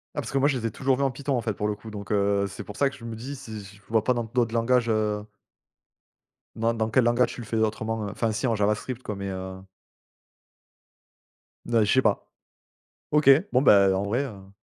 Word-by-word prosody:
Bah, - - -1
parce - - -7
que 135 - +1
moi 140 - +4
je 140 -3 +1
les 115 - -5
ai 115 - 0
toujours 135 +4 +1
vu 140 - 0
en 135 - +1
Python, 140 +2 -2
en - - -1
fait, 115 -2 -2
pour 105 +2 -2
le 105 - -1
coup, 110 +1 -11
donc, 100 -1 -7
heu, 100 -1 +2
c'est 100 +1 -8
pour 100 +1 -10
ça 140 - +3
que 140 - -12
je 115 - -11
me 115 -1 -5
dis 130 +6 -6
si 110 -6 -8
je 100 +1 -14
vois 110 -1 +2
pas 125 - +2
dans 120 - -1
d'autres 115 0 -1
langages, 120 +1 +2
heu 105 -1 0 1.3
dans 115 +1 +1
dans 110 -1 -1
quel 125 +3 +3
langage 120 +1 +2
tu - - -8
le - - -8
fais 115 - -2
autrement? 110 0 -1
Enfin 110 +2 -1
si 110 +4 -1
en 115 - +1
javascript, 105 +4 -1
quoi, 105 - -4
mais, 100 0 -5
heu 95 0 -6 2.1
Bah, 115 -2 +3
je 105 - +1
sais 130 - +5
pas. 105 -5 0 0.8
OK 150 -2 +4 0.2
bon, 125 - +3
ben, 100 -7 +6
en 95 +1 0
vrai, 115 +7 0
heu 100 -7 -10
110 Hz, 235 wpm, -26 LUFS, 105-125 Hz, 2.1 s, ben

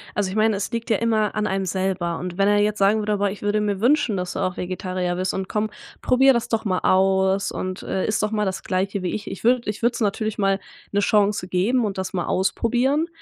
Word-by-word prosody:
Also 200 -2 0
ich 195 - -4
meine, 215 -1 +3
es 195 - -3
liegt 230 +1 -4
ja 220 - +4
immer 220 -2 +1
an 210 0 0
einem 195 0 -1
selber 185 -2 -1
und 180 0 -6
wenn 195 0 +3
er 205 0 +4
jetzt 210 0 +1
sagen 205 +2 +3
würde: 210 -1 0
„Boah 200 0 +1
ich 205 - -9
würde 205 +1 +1
mir 205 -1 -1
wünschen, 245 -4 +3
dass 180 -1 -3
du - - -4
auch 185 -1 -1
Vegetarier 185 0 -3
bist." 185 +1 -1
und 190 -1 -4
„Komm, 215 0 -1 0.3
probier 265 +1 +5
das 235 - -1
doch 225 -1 -1
mal 185 -3 +1
aus." 190 +1 +2
und, 185 0 -4
äh, 190 - -2
„Iss 210 - 0
doch 210 0 0
mal 210 -1 0
das 190 0 -3
Gleiche 195 +1 -1
wie 180 - -2
ich." 215 0 -6
Ich 195 - -8
würd 240 +1 +3
ich 210 +1 -3
würd's 235 0 +1
natürlich 215 +1 -1
mal 195 -1 +1 0.3
'ne 205 - +2
Chance 205 -1 +2
geben 220 +8 +1
und 200 -3 -2
das 190 +2 -4
mal 175 -2 -1
ausprobieren, 250 - +1
205 Hz, 250 wpm, -23 LUFS, 190-220 Hz, 0.3 s, probier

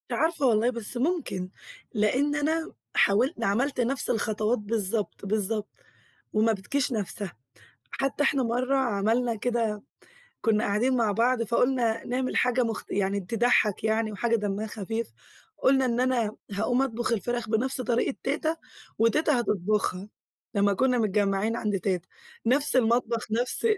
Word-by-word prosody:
مش - - -2
عارفة 320 -3 +1
والله 230 -1 +3
بس 235 0 -4
ممكن، 260 - -1 0.4
لإن 255 +7 +1
أنا 320 +3 0 0.2
حاول 235 +10 +3
عملت 250 +8 0
نَفس 260 +3 -1
الخطوات 220 0 0
بالضبط، 210 -1 -2
بالضبط، 210 +1 -1 0.6
وما 220 +1 +3
بتجيش 250 +8 -1
نَفسها، 205 -3 -3 0.6
حتى 275 +1 -1
إحنا 275 -2 +2
مَرّة 250 +3 +1
عملنا 230 0 +1
كده، 225 -2 -1 0.6
كنا 220 -2 +2
قاعدين 235 +6 +1
مع 225 -4 +2
بعض 235 +3 +2
فقلنا 235 0 +1
نعمل 255 +1 -1
حاجة 250 0 +3
مخ 230 -2 -2
يعني 200 0 0
تضحّك 215 +1 +2
يعني 220 0 +1
وحاجة 230 +3 +1
دمّها 205 0 -2
خفيف، 225 +2 -4 0.5
قلنا 265 0 +3
إن 240 -1 0
أنا 245 -4 +1 0.2
هاقوم 245 +6 +1
أطبخ 240 -3 -1
الفراخ 240 0 -2
بنَفس 250 +4 0
طريقة 245 +2 0
تيتا، 310 +4 0 0.4
وتيتا 255 +4 +3
هتطبخها، 205 -2 -1 0.5
لمّا 200 -1 +3
كنا 250 +4 +2
متجمّعين 205 0 +1
عند 210 -4 -1
تيتا، 185 -2 -2 0.4
نَفس 270 +3 +3
المطبخ، 235 -1 +2
نَفس 245 - 0
230 Hz, 135 wpm, -27 LUFS, 210-255 Hz, 0.6 s, والله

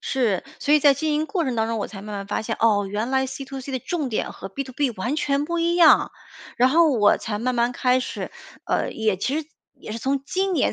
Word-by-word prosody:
是。 230 -9 0 0.2
所 290 - 0
以 300 - +5
在 285 -1 +6
经 300 +2 -1
营 310 +1 0
过 350 -2 -1
程 260 -3 -1
当 220 0 +1
中 230 -1 -1
我 - - -2
才 195 -2 -10
慢 210 0 -7
慢 200 0 -6
发 205 - -2
现， 225 0 -3
哦， 210 -3 +3
原 210 +5 -3
来 265 0 +1
C2C 270 0 -7
的 260 - -1
重 305 0 -3
点 220 - -2
和 - - -8
B2B 260 +3 -2
完 245 +10 -2
全 280 -1 0
不 340 +2 -2
一 340 +1 +1
样。 335 -3 +6 0.5
然 250 +2 +5
后 325 0 +5
我 210 -5 +4
才 210 -2 -4
慢 250 +3 -1
慢 240 +1 +1
开 250 +1 +2
始， - - -5 0.3
呃， - - 0
也 215 -3 0
其 265 +10 -1
实 300 - -12 0.3
也 215 - -8
是 230 - -4
从 270 +3 -1
今 380 +4 -1
年 285 - +2
260 Hz, 275 characters per minute, -23 LUFS, 220-290 Hz, 0.5 s, 在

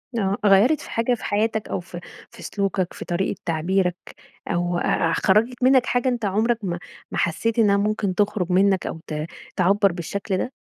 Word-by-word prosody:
آه، 200 -3 0
غيَّرت 210 +10 +5
في - - -10
حاجة 230 +2 +1
في - - -13
حياتك 215 +1 0
أو - - -2
في 175 0 -9 0.3
في - - -13
سلوكك، 195 -3 -2
في - - -8
طريقة 175 +2 -1
تعبيرك 180 +2 0 0.5
أو 175 0 0
أ 165 -1 +1
أ - - 0
خرَّجت 230 +8 +2
منك 260 -1 +5
حاجة 245 +1 +1
أنتَ 240 -3 -2
عمرك 220 +4 +1
ما 175 -2 -3 0.3
ما - - -4
حسيت 225 +7 0
إنها 205 -3 +4
ممكن 205 -2 0
تخرج 205 -3 0
منك 190 0 +3
أو - - -5
ت 150 0 -3 0.3
تعبَّر 195 +2 +3
بالشكل 190 +3 -3
ده؟ 250 - -3
200 Hz, 185 wpm, -23 LUFS, 180-220 Hz, 0.5 s, غيَّرت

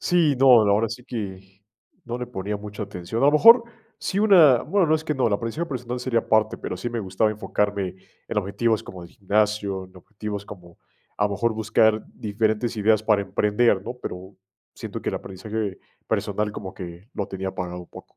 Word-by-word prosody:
Sí, 170 -5 +3
no, 135 +2 +3 0.2
ahora 105 +3 +3
sí 115 +3 -8
que, 95 -5 -7 0.4
no 120 0 -4
le 125 - -4
ponía 105 -3 -4
mucha 105 +1 -7
atención. 100 +3 -4
A - - +6
lo 145 - +5
mejor, 230 +10 +8 0.4
sí 195 - -2
una 175 - +6
bueno, 200 -3 +2
no 155 - +4
es 155 - -8
que 150 - -1
no, 130 -3 +2
el - - -2
aprendizaje 115 +11 -2
personal 125 -4 -4
sería 125 -2 +1
aparte, 110 -1 +1
pero - - -5
sí 110 +7 -4
me 120 - -3
gustaba 95 +2 0
enfocarme 100 -3 -2 0.3
en - - -1
objetivos 105 +3 0
como 90 -2 -10
el - - -12
gimnasio, 105 -2 0
en 95 0 -18
objetivos 105 +2 -7
como, 90 -4 -13 0.4
a 105 - +1
lo 105 - 0
mejor, 115 +4 0
buscar 110 0 +2
diferentes 110 +2 -1
ideas 110 0 +3
para 105 -2 +3
emprender, 105 +1 +2
¿no? 120 +5 -6
Pero 95 +2 -7 0.4
siento - - -6
que - - -2
el - - -5
aprendizaje 105 +1 -5 0.3
personal 105 +1 -1
como 95 -3 -7
que 90 +2 -9
lo 100 - -3
tenía 95 0 -4
apagado 90 -1 -5
un 90 - -13
poco. - - -14
105 Hz, 200 wpm, -24 LUFS, 100-120 Hz, 0.4 s, mejor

